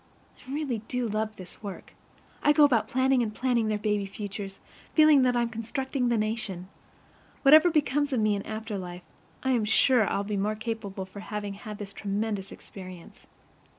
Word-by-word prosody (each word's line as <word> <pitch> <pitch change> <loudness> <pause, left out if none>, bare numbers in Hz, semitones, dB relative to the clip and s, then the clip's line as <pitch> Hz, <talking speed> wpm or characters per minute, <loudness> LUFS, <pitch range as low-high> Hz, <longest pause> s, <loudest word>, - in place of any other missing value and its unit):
I 255 - -12
really 280 -5 -2
do 250 -1 -1
love 215 0 -2
this 185 -1 -11
work. 200 -3 -8 0.5
I 295 - +5
go 300 - +6
about 235 -7 +4
planning 260 +1 +2
and 225 -3 -1
planning 240 -3 +1
their 215 -1 +1
baby 210 -1 0
futures, 195 -1 -6 0.4
feeling 310 -3 +7
that 250 -1 +3
I'm 240 -1 +2
constructing 245 +3 -2
the 235 - +2
nation. 210 -4 -3 0.7
Whatever 310 +5 +8
becomes 290 -2 +1
of 255 - +1
me 215 -1 +3
in 200 - -1
after 215 -1 -5
life, 180 -1 -7 0.4
I 265 - +1
am 240 -4 +2
sure 220 +1 +4
I'll 200 - 0
be 205 0 -2
the - - 0
more 210 +2 0
capable 215 -4 -4
for 190 +2 -11
having 205 -1 -5
had 210 +1 -8
this 200 -1 -7
tremendous 205 -1 -3
experience. 185 -3 -11
220 Hz, 185 wpm, -28 LUFS, 200-255 Hz, 0.7 s, Whatever